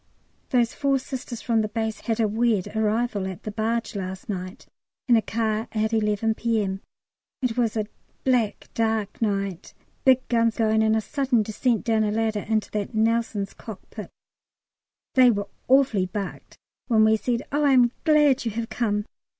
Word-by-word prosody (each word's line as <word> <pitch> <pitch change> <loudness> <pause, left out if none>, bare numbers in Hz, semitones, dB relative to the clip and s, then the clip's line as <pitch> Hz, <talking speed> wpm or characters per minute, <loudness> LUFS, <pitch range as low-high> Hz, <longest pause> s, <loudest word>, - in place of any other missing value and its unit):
Those 240 -2 +2
four 275 -1 +1
Sisters 255 -3 -6
from 230 -2 +2
the 215 - -1
base 220 0 -3
had 230 -1 -2
a 220 - +3
weird 220 -2 0
arrival 220 -2 0
at 185 -2 -7
the 215 - -4
barge 230 +2 -1
last 190 0 -5
night 185 0 -5 0.4
in 240 - +6
a 225 - +4
car 220 0 -1
at 220 +1 0
11 215 0 +1
P.M. 215 -4 -1 0.6
It 240 -3 0
was 230 -3 0
a 215 - 0 0.4
black 245 -5 +1
dark 220 -2 -1
night, 195 -4 -2 0.3
big 260 -1 +4
guns 230 -1 +2
going, 220 -1 +2
and 220 0 +3
a 220 - +1
sudden 255 -1 +1
descent 220 +2 0
down 225 -2 +2
a 210 - +1
ladder 220 0 0
into 215 0 -1
that 210 +1 -3
Nelson's 220 -2 0
cockpit. 210 -1 -9 1.0
They 255 -1 +7
were 205 -3 0 0.2
awfully 255 -8 +3
bucked 195 0 -6 0.3
when 220 -3 +4
we 220 0 +5
said, 235 +2 -1
"Oh, 295 +1 +1
I 280 -2 +4
am 245 -2 +5
glad 295 -4 +4
you 235 - -1
have 225 +1 -4
come." 210 -3 -1
220 Hz, 170 wpm, -24 LUFS, 210-235 Hz, 1.0 s, They